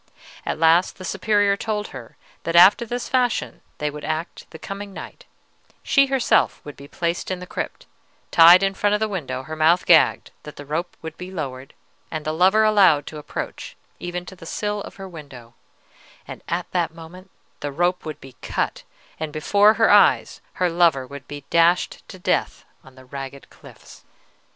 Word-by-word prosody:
At - - -1
last 165 +3 +3
the 185 - -9
Superior 205 +1 +1
told 210 0 -3
her 120 -4 -11 0.2
that 170 - -3
after 190 +7 +7
this 245 +2 -4
fashion 250 -3 -1 0.2
would 150 -1 -2
they - - -5
act 160 +2 -5
the 160 - -11
coming 200 +3 -8
night: - - -10 0.6
she 275 -1 +3
herself 270 -2 +2
would 145 - -9
be 140 - -13
placed 170 +2 -3
in 185 - -2
the 180 - -8
crypt, - - -6 0.5
tied 175 +3 +8
in 195 0 +1
front 205 +1 +1
of - - -1
the 220 - 0
window, 135 -10 -4
her 155 +3 -7
mouth 160 +3 +3
gagged; 165 -3 +4
that 150 - -11
the 145 - -10
rope 165 +5 -4
would 160 0 -8
be 180 +1 -7
lowered, 135 -7 -7 0.3
and 155 -1 -5
the 155 - -1
lover 190 +6 +4
allowed 190 -9 +4
to 155 -1 -8
approach 150 - -7 0.2
even 175 0 -5
to 190 - -11
the 165 -2 -12
sill 210 +2 -3
of - - -10
her 195 -1 -9
window, 140 -9 -12 0.7
and - - -9
at 175 +1 -2
that 175 -3 0
moment 175 +3 -12 0.3
the 145 - -4
rope 175 +5 0
would 155 -2 -7
be 135 -2 -14
cut, - - -2 0.4
and 155 -1 -4
before 205 +8 +3
her 225 0 +3
eyes 205 -1 +4
her 180 - 0
lover 165 -6 +2
would 140 +1 -11
be 145 0 -9
dashed 170 +1 +2
to 185 - -10
death 180 - -1 0.2
on 135 -1 -17
the 130 0 -16
ragged 135 +1 -9
cliffs. - - -16
170 Hz, 185 wpm, -22 LUFS, 150-195 Hz, 0.7 s, tied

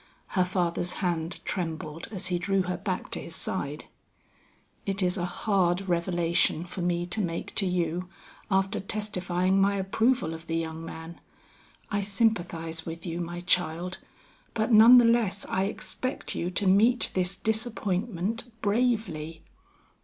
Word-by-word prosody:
Her 185 - +2
father's 175 -1 0
hand 170 -2 -2
trembled 165 -2 -4
as 195 -5 -4
he 175 -1 0
drew 195 +1 +1
her 180 0 -2
back 185 0 -3
to - - -1
his 165 - -6
side. 150 -5 -3 1.0
"It 195 -1 -1
is 180 +1 +2
a 175 -3 -1
hard 185 0 +1
revelation 170 -1 +1
for 180 +1 -6
me 175 0 0
to 195 +5 -1
make 170 -3 -3
to 195 - +1
you, 175 0 -1 0.4
after 195 0 +1
testifying 190 -2 0
my 200 +1 +3
approval 210 -1 +1
of 165 0 -9
the 165 - 0
young 160 0 -4
man. 165 +1 -8 0.7
I 205 -1 +1
sympathize 175 -6 0
with 165 +2 -7
you, 170 0 -3
my 175 +1 -5
child, 180 0 0 0.6
but 220 +2 +1
none 225 +3 +9
the 240 - +7
less 225 -4 +2
I 190 +1 0
expect 255 +5 -4
you 170 - -2
to 185 +3 -1
meet 220 +6 +4
this 185 0 +1
disappointment 220 -1 -1 0.2
bravely. 205 -8 0
180 Hz, 145 wpm, -28 LUFS, 170-200 Hz, 1.0 s, none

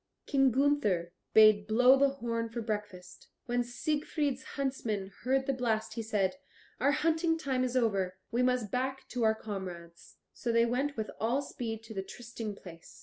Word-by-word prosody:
King 270 -1 +4
Gunther 235 -10 +1 0.2
bade 215 -1 +6
blow 250 +4 +6
the 280 +1 +4
horn 230 -4 -3
for 230 +1 -5
breakfast. 205 -5 -5 0.2
When 245 0 0
Siegfried's 290 +1 -1 0.2
huntsman 225 -8 -2
heard 265 +1 +1
the 275 - +1
blast 225 -4 -1
he 230 - -3
said: 215 +2 0 0.4
"Our 280 - +3
hunting 325 +2 +1
time 265 -5 -1
is 255 0 0
over; 195 -6 +1
we 240 +1 +1
must 250 -4 +1
back 265 +1 -2
to 250 - -3
our 220 0 +4
comrades." 180 -6 -8 0.2
So 240 - -2
they 230 0 +4
went 265 +4 -1
with 215 -1 -3
all 245 +6 +1
speed 225 -4 -5
to 225 0 -9
the 195 - -2
trysting 225 0 -7
place. 170 -4 -13
235 Hz, 170 wpm, -31 LUFS, 215-265 Hz, 0.4 s, bade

